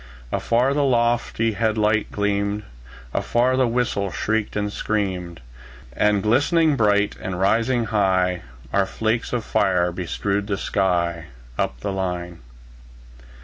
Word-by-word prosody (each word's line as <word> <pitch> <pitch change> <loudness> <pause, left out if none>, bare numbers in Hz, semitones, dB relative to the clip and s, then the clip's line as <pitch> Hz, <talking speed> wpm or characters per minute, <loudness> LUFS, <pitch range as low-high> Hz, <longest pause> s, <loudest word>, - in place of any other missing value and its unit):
Afar 125 +4 +1
the 145 0 +1
lofty 120 -3 +1
head 110 +1 0
light 105 0 +1
gleamed; 100 0 -1 0.5
Afar 125 +2 +1
the 130 -1 +3
whistle 115 -5 -1
shrieked 110 +3 -1
and 105 0 -2
screamed; 90 -7 -2 0.5
And 105 +6 +2
glistening 145 +7 +3
bright, 105 -3 +2
and 90 -1 -4
rising 115 +5 +2
high, 95 -4 +1 0.3
Our 100 -1 +2
flakes 115 +1 -1
of 120 -3 -2
fire 90 -2 +2
bestrewed 100 +4 -2
the 100 -2 -1
sky, 85 -4 0 0.3
Up 60 -1 -1
the 100 - -2
line. 90 -2 -3
105 Hz, 125 wpm, -22 LUFS, 95-115 Hz, 0.5 s, the